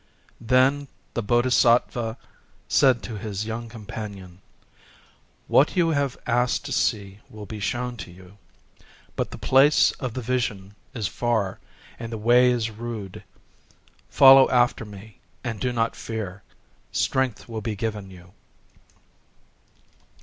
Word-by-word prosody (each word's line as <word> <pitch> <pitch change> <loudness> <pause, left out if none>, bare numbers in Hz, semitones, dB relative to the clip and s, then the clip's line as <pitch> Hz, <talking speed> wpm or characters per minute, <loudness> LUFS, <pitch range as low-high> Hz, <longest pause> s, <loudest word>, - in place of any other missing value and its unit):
Then 130 +4 +2 0.3
the 120 - -1
Bodhisattva 120 0 +2 0.5
said 130 -3 +3
to 110 -4 -6
his 105 0 -4
young 115 +1 -5 1.8
companion:—"What 145 - +3
you 170 -2 +3
have 140 -4 -1
asked 125 +3 0
to 145 - -6
see 100 -6 -1
will 105 -1 -10
be 105 +1 -8
shown 120 +3 -3
to 95 -3 -8
you. 95 +3 -16 0.8
But - - -2
the - - -9
place 135 +3 +4
of 125 -4 -4
the 130 - -3
Vision 110 -5 -2 0.2
is 110 -5 -2
far; 110 +2 -1 0.4
and 115 0 -6
the 115 - -4
way 120 +3 +4
is 115 -2 0
rude. 110 -3 -7 0.9
Follow 135 0 +8
after 120 -1 +2
me, 105 0 -13 0.2
and 115 -4 -4
do 125 - -1
not 115 -1 -1
fear: 105 -4 -6 0.5
strength 130 -4 -1
will 115 -2 -5
be 105 0 -3
given 105 -2 -4
you." 90 -1 -15
115 Hz, 130 wpm, -24 LUFS, 105-125 Hz, 1.8 s, Follow